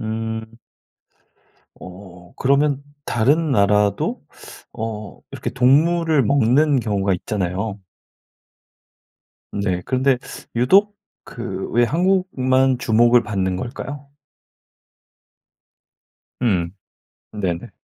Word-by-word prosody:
음 110 0 -4 1.3
어. 90 -1 -13
그러면 140 +1 +1 0.2
다른 145 +7 +1
나라도 100 -2 +2 0.5
어 110 -2 -6
이렇게 - - -4
동물을 150 +4 +3
먹는 140 +2 +3
경우가 100 -3 0
있잖아요? 100 +2 -3 1.7
네. 95 -3 -2
근데 130 0 +2 0.4
유독 195 - +4 0.3
그 115 -6 -6
왜 120 +1 +3
한국만 135 -6 +1
주목을 120 +1 +4
받는 95 -3 -1
걸까요? 140 +5 -7 2.3
음. 90 -8 +1 0.6
네네. 95 -5 -3
120 Hz, 160 characters per minute, -20 LUFS, 100-140 Hz, 2.3 s, 유독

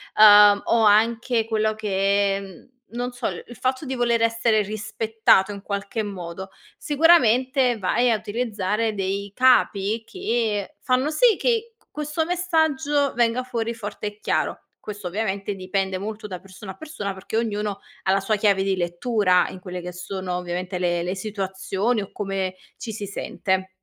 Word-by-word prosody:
uhm, 205 -1 +8
o 230 -1 +3
anche 225 +2 +3
quello 215 -1 0
che 200 -1 +1
mhmm, 195 +1 -13 0.2
non 245 +1 -4
so, 245 - -7
il - - -5
il 240 - -11
fatto 260 +3 -1
di 265 - -3
voler 235 -2 +1
essere 230 -1 +2
rispettato 215 -1 +1
in 200 -1 -8
qualche 200 +2 -3
modo, 190 -1 -7 0.3
sicuramente 260 -5 +3
vai 235 +6 +2
a - - +3
utilizzare 215 -1 -2
dei 200 0 -3
capi 225 -4 +3
che 230 - -2
fanno 255 +2 +1
sì 445 +8 +4
che 465 -1 0
q - - -32
questo 300 +2 -2
messaggio 315 -5 +1
venga 235 +1 +2
fuori 235 -2 -3
forte 210 -2 -7
e 210 0 -5
chiaro. - - -1 0.3
Questo, 205 -3 -5
ovviamente, 200 +1 -2
dipende 190 0 -2
molto 210 +2 -6
da 185 -3 -6
persona 190 +1 -10
a 190 - -13
persona. 255 -11 -5
Perché 190 +3 -7
ognuno 210 -3 -1 0.2
ha 190 - +2
la 195 - +2
sua 210 +2 0
chiave 200 -2 +2
di 195 -1 0
lettura 180 +2 +2
in 185 - -9
quelle 180 -1 -6
che 180 +1 -6
sono, 180 0 -4
ovviamente, 180 +1 -4
le 175 -1 0
le 180 +1 -2
situazioni 195 +2 -2
o 195 - -12
come 195 -2 -3 0.2
ci 220 - -6
si 210 -1 -5
sente. 190 -1 -2
210 Hz, 165 wpm, -23 LUFS, 195-240 Hz, 0.3 s, uhm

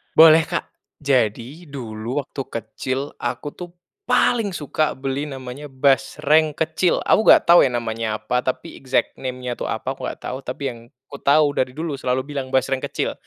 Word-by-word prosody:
Boleh, 160 0 +8
Kak. - - -2 0.4
Jadi 135 +4 0
dulu 120 -1 -4
waktu 135 - -6
kecil, 130 +5 -4
aku 145 - -3
tuh 175 -1 -8 0.4
paling 210 -6 +2
suka 155 0 -1
beli 135 +2 -3
namanya 135 +1 -7
basreng 150 +3 +2
kecil. 160 +3 +1
Aku 220 - +3
enggak - - +8
tahu 170 +1 +8
ya - - +2
namanya 115 -2 -2
apa, 110 +4 -1
tapi, 130 0 -4
exact 130 -1 -1
name-nya 125 -1 -4
tuh - - -3
apa, - - -3
aku - - -6
enggak - - -7
tahu, 125 - -4
tapi 135 +2 -6
yang 120 - -11 0.3
kutahu, 145 +1 +3
dari 130 -2 -1
dulu 160 -1 -3
selalu 130 0 0
bilang 140 -2 -4
basreng 130 0 +1
kecil. - - -2
135 Hz, 165 wpm, -22 LUFS, 125-150 Hz, 0.4 s, Boleh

